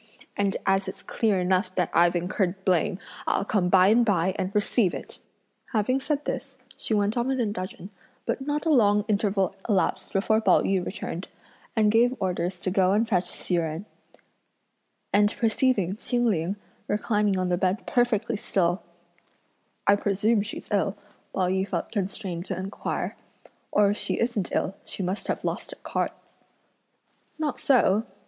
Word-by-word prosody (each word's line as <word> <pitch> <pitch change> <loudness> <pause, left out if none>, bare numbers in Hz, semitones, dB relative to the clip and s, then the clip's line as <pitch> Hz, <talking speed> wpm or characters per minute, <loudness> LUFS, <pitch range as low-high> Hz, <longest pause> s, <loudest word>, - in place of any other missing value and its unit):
and 200 -1 0
as 195 0 +2
it's 190 - -7
clear 210 -4 +1
enough 185 +1 +1
that 180 - 0
I've 170 +1 +4
incurred 185 +2 -1
blame, 180 -1 +2 0.3
I'll - - +1
come 195 -4 +1
by 185 +1 +6
and 235 +3 +5
by 190 -4 +2
and 185 - -2
receive 205 -2 +2
it!" - - -6 0.5
Having 240 +5 +2
said 295 +1 -2
this, 270 -1 -4 0.2
she 220 - -1
went 205 +1 +1
off 240 0 0
in 265 -1 0
a 240 - +2
dudgeon, 190 -1 -5 0.3
but - - -1
not 295 +3 -2
a 325 - +3
long 210 -6 +4
interval 200 -3 +1
elapsed 195 -3 +1
before 220 +3 +2
Pao - - +4
yü 190 -2 +1
returned, 185 -2 -5 0.5
and 215 -2 +4
gave 240 +3 +4
orders 180 -1 -1
to 185 - -1
go 190 0 +3
and 220 +3 +2
fetch 185 -5 +1
Hsi 180 - 0
Jen; 165 +3 -2 1.3
and 205 +1 +3
perceiving 220 -4 +1
Ching 240 +1 0
Ling 185 -3 +1 0.3
reclining 210 -1 +1
on 185 -1 0
the 175 - +2
bed 190 +3 0
perfectly 235 -2 +1
still: 180 -3 0 1.0
"I 205 - +6
presume 205 +2 +1
she's 210 - -7
ill," 200 0 +1 0.3
Pao 185 -1 0
yü 190 +1 0
felt 175 -4 -3
constrained 190 -3 -3
to 190 - -3
inquire, 190 +2 -3 0.6
"or 205 -1 +4
if 205 - -2
she - - -1
isn't 230 -5 -1
ill, - - 0
she 195 - -5
must 185 +3 -2
have - - -2
lost - - -3
at - - -19
cards." - - -2 1.2
"Not 310 -2 -2
so!" 230 -5 +3
200 Hz, 165 wpm, -26 LUFS, 185-220 Hz, 1.3 s, by